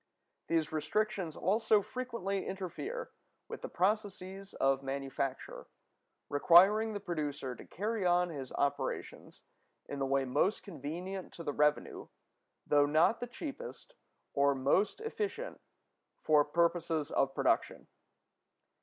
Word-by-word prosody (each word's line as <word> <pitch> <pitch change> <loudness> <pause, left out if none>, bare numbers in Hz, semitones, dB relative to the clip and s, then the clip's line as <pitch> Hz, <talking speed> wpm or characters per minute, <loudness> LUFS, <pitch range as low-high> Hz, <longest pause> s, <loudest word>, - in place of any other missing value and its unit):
These 165 -2 +1
restrictions 175 +2 -1
also 210 +2 +3
frequently 230 -7 -3
interfere 195 - -5 0.4
with - - -7
the - - -5
processes 195 0 -2
of 135 0 +2
manufacture, 135 0 -4 0.6
requiring 195 +9 +6
the 205 - -3
producer 150 -8 -3
to - - -12
carry 215 +3 -2
on 180 0 +3
his 135 -5 -6
operations 140 0 -3 0.4
in 140 - -5
the 135 - 0
way 135 0 +2
most 180 +11 +1
convenient 180 +3 -6
to 170 - -8
the 145 - -2
revenue, 150 +1 +1 0.6
though 145 -1 +4
not 155 +9 +4
the 245 - -4
cheapest 325 - -8 0.4
or 140 0 +3
most 145 - +1
efficient 450 +2 -4 0.6
for 150 -1 +5
purposes 165 -1 +1
of 135 0 +1
production. - - +1
175 Hz, 120 wpm, -33 LUFS, 145-205 Hz, 0.6 s, requiring